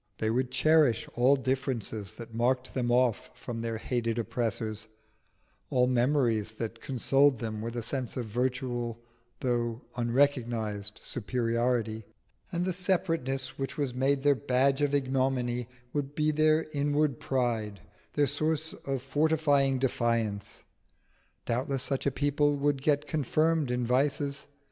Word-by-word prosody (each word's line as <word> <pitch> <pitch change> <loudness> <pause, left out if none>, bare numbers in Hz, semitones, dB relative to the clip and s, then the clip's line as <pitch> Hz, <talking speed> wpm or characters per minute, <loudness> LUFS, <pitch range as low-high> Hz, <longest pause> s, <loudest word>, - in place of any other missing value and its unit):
They 110 0 0
would 125 +2 0
cherish 155 -6 +3
all 125 +4 +4
differences 130 -7 -2
that 115 -1 -10
marked 125 +3 0
them 120 -2 0
off 125 -2 +2
from 115 -2 -6
their 115 -1 -2
hated 115 0 -1
oppressors, 110 -2 -2 0.8
all 125 -1 +3
memories 120 -4 +2
that 115 +1 -5
consoled 135 +1 +3
them 110 -1 -4
with 115 +1 -4
a 120 - -3
sense 125 +1 -4
of 125 - -2
virtual 120 0 -2 0.4
though 120 -1 -1
unrecognised 120 -5 0
superiority; 115 -1 -1 0.5
and 175 +1 -1
the 185 - 0
separateness 165 -8 -1
which 135 - -3
was 140 -4 -1
made 135 +2 +1
their 145 0 +6
badge 135 +1 +2
of 145 0 +2
ignominy 130 -3 0 0.3
would 145 -1 -2
be 155 0 +2
their 155 +1 +3
inward 145 -1 +1
pride, 115 -6 -1 0.3
their 145 - +3
source 155 +2 -1
of 135 -2 -4
fortifying 145 -1 +2
defiance. 115 -5 -1 0.8
Doubtless 130 +2 -1
such 135 0 -1
a - - +2
people 145 +1 +1
would 140 -1 +1
get 145 0 +2
confirmed 155 0 +1
in 125 0 0
vices. 140 +3 0
130 Hz, 135 wpm, -29 LUFS, 115-145 Hz, 0.8 s, their